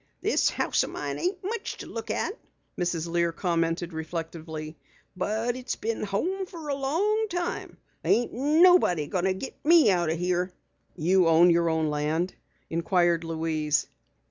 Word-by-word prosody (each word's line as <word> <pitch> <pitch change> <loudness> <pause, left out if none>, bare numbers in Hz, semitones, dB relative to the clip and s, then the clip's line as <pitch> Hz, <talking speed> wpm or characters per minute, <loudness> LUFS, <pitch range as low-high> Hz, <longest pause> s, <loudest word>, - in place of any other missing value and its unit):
"This - - +2
house - - +1
o' - - -4
mine - - -4
ain't 365 +1 -2
much 425 +3 -4
to - - -8
look - - -7
at," - - -1 0.4
Mrs. 170 -2 -1
Lear 170 0 +1
commented 170 0 -1
reflectively, 160 -1 -6 0.4
"but 220 +6 -1
it's 255 0 -4
been 225 +1 -3
home 355 - -2
fer 330 -5 -8
a - - +1
long 380 +11 0
time. 350 -1 -3 0.3
Ain't 240 +1 +2
nobody 295 - +4
going 180 +4 -1
to 190 - +2
get 265 - -8
me 320 -8 +6
out 175 -3 +1
o' 160 - +1
here." 180 +1 -1 0.4
"You 180 +2 +3
own 165 +2 +6
your 170 0 +3
own 160 -1 0
land?" 155 +5 -1 0.4
inquired 170 0 +2
Louise. 160 -2 0
180 Hz, 155 wpm, -27 LUFS, 165-270 Hz, 0.4 s, me